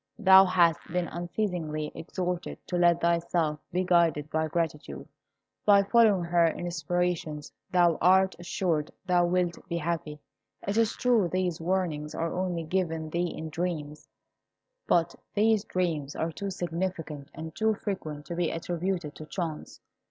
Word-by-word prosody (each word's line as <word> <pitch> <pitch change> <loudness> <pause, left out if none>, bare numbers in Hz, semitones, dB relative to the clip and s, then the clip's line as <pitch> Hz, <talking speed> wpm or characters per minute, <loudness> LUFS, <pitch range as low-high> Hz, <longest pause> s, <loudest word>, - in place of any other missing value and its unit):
"Thou 190 -3 +8
hast 170 -3 +3
been 180 0 0
unceasingly 170 -4 -3
exhorted 180 +1 -4
to 180 - -4
let 175 -1 +4
thyself 170 -2 +1
be 180 +2 0
guided 165 -4 +2
by 160 0 0
gratitude. 150 - -3 0.6
By 200 -1 +6
following 210 -3 +4
her 170 0 +3
inspirations 170 -2 -2 0.2
thou 175 -3 +3
art 190 +2 +4
assured 175 -3 -1 0.2
thou 175 -1 +3
wilt 175 -1 0
be 170 - -1
happy. 155 -2 -3 0.5
It 200 - 0
is 225 -1 +2
true 235 -7 +2
these 180 -2 -1
warnings 165 -4 -1
are 165 0 -2
only 180 -2 -2
given 160 -2 -2
thee 170 +1 0
in 160 - -5
dreams; 155 -3 -4 0.8
but 170 0 +2 0.2
these 215 0 +3
dreams 160 -8 -2
are 165 +1 -1
too 200 +5 -5
significant 170 -5 -4
and 160 0 -7
too 220 +4 +1
frequent 155 -9 -5
to 170 - -5
be 175 -1 0
attributed 170 -1 -3
to 155 - -9
chance. 165 -4 -5
170 Hz, 145 wpm, -28 LUFS, 160-185 Hz, 0.8 s, Thou